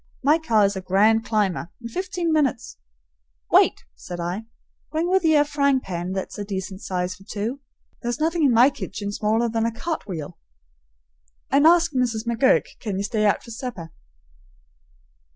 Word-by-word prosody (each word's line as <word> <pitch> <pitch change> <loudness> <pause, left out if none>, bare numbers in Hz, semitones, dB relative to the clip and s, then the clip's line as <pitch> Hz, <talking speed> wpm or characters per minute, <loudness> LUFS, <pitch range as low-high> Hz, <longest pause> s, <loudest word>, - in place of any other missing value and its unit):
"My 300 +4 +4
car 225 -10 +3
is 200 0 0
a 190 - -4
grand 210 +4 +3
climber. 200 -6 0
In 235 - -7
fifteen 355 - -2
minutes 275 -6 0 0.4
" - - -41
"Wait!" - - +4
said 175 - -8
I. 180 +6 -3 0.5
"Bring 320 +2 0
with 380 -1 +3
ye 320 -1 +4
a 295 0 +5
frying 280 -2 +2
pan 180 -4 -5
that's 190 +2 -5
a - - -2
decent 190 -1 -5
size 180 -1 -2
for 190 +1 -16
two. 215 +6 -4 0.4
There's 240 +3 -3
nothing 325 +1 +1
in 275 - +5
my 245 +4 +6
kitchen 205 -6 -5
smaller 220 +3 +1
than 225 0 -1
a - - -1
cart 310 +4 -4
wheel. 160 -7 -6 1.1
And 285 +3 +5
ask 335 -1 +5
Mrs. 240 -4 -1
McGurk 235 +4 +3
can 205 -5 -4
ye 200 - -1
stay 215 0 +1
out 205 - +1
for 235 - -11
supper." 220 -9 -6
225 Hz, 175 wpm, -23 LUFS, 195-280 Hz, 1.1 s, my